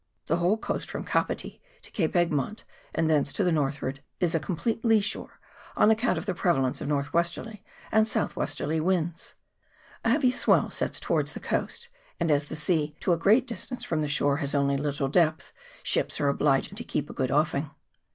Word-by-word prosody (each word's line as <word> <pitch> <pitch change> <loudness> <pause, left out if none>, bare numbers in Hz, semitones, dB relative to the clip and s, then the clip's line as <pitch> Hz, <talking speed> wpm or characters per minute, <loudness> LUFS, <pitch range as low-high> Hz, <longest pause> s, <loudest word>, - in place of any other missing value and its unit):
The 165 - +1
whole 180 +5 +2
coast - - -4
from - - -4
Kapiti - - -2 0.2
to - - -14
Cape 165 -6 -1
Egmont, 175 - 0 0.3
and 165 - 0
thence 150 -3 +2
to 205 - 0
the 180 - +2
northward, 140 -3 -1 0.2
is 175 -3 +1
a 165 - +2
complete 190 +8 -2
lee 225 -2 +5
shore, 205 +1 -3 0.4
on 215 - +5
account 220 +3 +2
of - - -4
the 195 - -1
prevalence 150 -8 +1
of - - -3
north 145 -1 -1
westerly 170 +5 -1 0.3
and 220 0 +4
south - - -1
westerly 150 +2 -2
winds; 170 -1 -1 0.7
a - - +2
heavy 255 +1 +4
swell - - +3
sets - - -2
towards - - 0
the - - -6
coast, 475 - -3 0.3
and, 170 -2 +1
as 145 0 +2
the 150 - -7
sea 150 -1 0
to 180 - +2
a - - +4
great 215 +9 +4
distance 245 +1 -5
from 160 -2 -1
the 150 - 0
shore 140 -1 +2
has 145 -1 -2
only 140 0 +2
little 140 0 -1
depth, 155 +2 +1 0.3
ships - - +1
are 145 - +2
obliged 140 +6 +1
to 240 - -6
keep 145 -10 -2
a - - -9
good 130 -2 -1
offing. 150 +1 +1
165 Hz, 200 wpm, -27 LUFS, 145-200 Hz, 0.7 s, lee